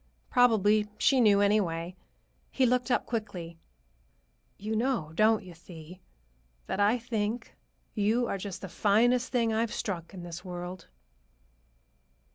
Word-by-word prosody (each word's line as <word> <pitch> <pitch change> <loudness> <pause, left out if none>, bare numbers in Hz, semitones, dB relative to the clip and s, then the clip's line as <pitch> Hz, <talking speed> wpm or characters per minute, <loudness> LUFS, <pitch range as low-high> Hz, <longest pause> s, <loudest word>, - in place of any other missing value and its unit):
Probably 215 -4 +4
she 265 +3 +3
knew, 205 -3 +5
anyway. 180 -4 +1 0.5
He 265 - +1
looked 250 0 +1
up 245 - +1
quickly. 175 -8 -5 1.0
"You 215 +2 -3
know, 230 - -1
don't 215 +4 +3
you, 180 -2 -11
Thee, 165 +1 -12 0.7
that - - -3
I 205 +4 +3
think 230 -1 -3 0.4
you 220 +3 +1
are 200 - -3
just 190 -1 -6
the 195 - -6
finest 235 +7 +2
thing 230 -3 +1
I've 225 0 0
struck 170 -5 -4
in 180 - -8
this 175 0 -8
world?" 180 0 -7
210 Hz, 130 wpm, -29 LUFS, 180-230 Hz, 1.0 s, knew